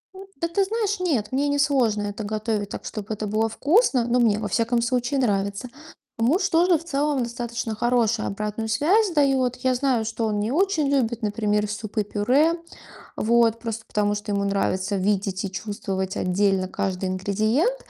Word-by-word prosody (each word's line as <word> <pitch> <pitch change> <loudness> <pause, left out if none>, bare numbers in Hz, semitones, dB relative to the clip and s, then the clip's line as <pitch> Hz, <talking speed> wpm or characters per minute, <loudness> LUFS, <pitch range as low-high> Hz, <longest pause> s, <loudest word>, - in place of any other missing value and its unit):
М, 380 - -9 0.2
да 335 - +1
ты 390 +4 +1
знаешь, 420 -1 -1
нет, 270 - 0
мне 280 +2 +1
не 285 0 0
сложно 245 -8 +2
это 205 +1 -4
готовить 215 -1 -2
так, - - -7
чтобы 215 -1 -5
это 215 0 -4
было 220 +2 +1
вкусно, 285 - +2
но 245 +1 +2
мне, 215 -3 +3
во 210 - -3
всяком 235 +1 +1
случае, 250 +3 0
нравится. 200 0 0 0.5
Муж 335 - +2
тоже 345 0 +4
в 325 - -11
целом 290 -4 0
достаточно 235 -1 -4
хорошую 230 -1 +1
обратную 210 +2 -3
связь 370 - +3
дает. 265 -4 +2
Я 255 0 +1
знаю, 250 -3 +1
что 225 +1 -2
он 210 -1 -1
не 220 +4 -1
очень 325 -3 +1
любит, 235 -4 0
например, 210 0 0
супы-пюре. 215 +9 +1 0.6
Вот. 230 0 +3
Просто 225 -1 -5
потому, 205 0 0
что 205 0 -5
ему 200 0 0
нравится 195 0 0
видеть 195 0 0
и 195 - -4
чувствовать 190 -2 -4
отдельно 190 0 +1
каждый 190 -2 -2
ингредиент. 215 - +1
225 Hz, 170 wpm, -24 LUFS, 205-275 Hz, 0.6 s, тоже